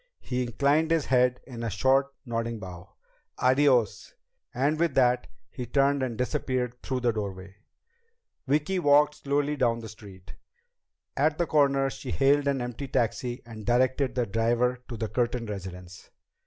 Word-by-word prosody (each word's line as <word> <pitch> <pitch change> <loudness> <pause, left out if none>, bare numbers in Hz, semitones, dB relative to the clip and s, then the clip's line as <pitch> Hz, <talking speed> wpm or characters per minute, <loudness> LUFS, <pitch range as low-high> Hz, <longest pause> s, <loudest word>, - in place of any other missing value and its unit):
He 125 0 -3
inclined 140 +6 +1
his 165 -3 +1
head 125 -1 +2
in 120 -3 -8
a 115 - -2
short, 130 +7 +2 0.2
nodding 115 -1 -3
bow. 95 -1 -10 0.4
"Adiós." 130 -4 +2 0.4
And 145 +5 0
with 165 -5 +1
that 125 -1 +3 0.2
he 125 -3 -6
turned 140 +2 +2
and 125 -4 -2
disappeared 125 -1 -2
through 130 -1 -3
the 120 -1 +2
doorway. 100 -3 -6 0.9
Vicki 150 +7 +1
walked 150 -1 +4
slowly 145 +1 0
down 120 -4 +1
the 115 -1 -8
street. 100 -3 -13 0.8
At 150 +2 +1
the 175 - +1
corner 140 -3 +2
she - - -8
hailed 140 +1 +2
an 140 -2 0
empty 125 +3 -5
taxi 120 +1 -1
and 110 -2 -10
directed 130 +2 +1
the 125 -2 +1
driver 115 +4 +1
to 120 - -6
the 110 0 -2
Curtin 120 +1 -1
residence. 90 -4 -8
125 Hz, 155 wpm, -27 LUFS, 115-140 Hz, 0.9 s, walked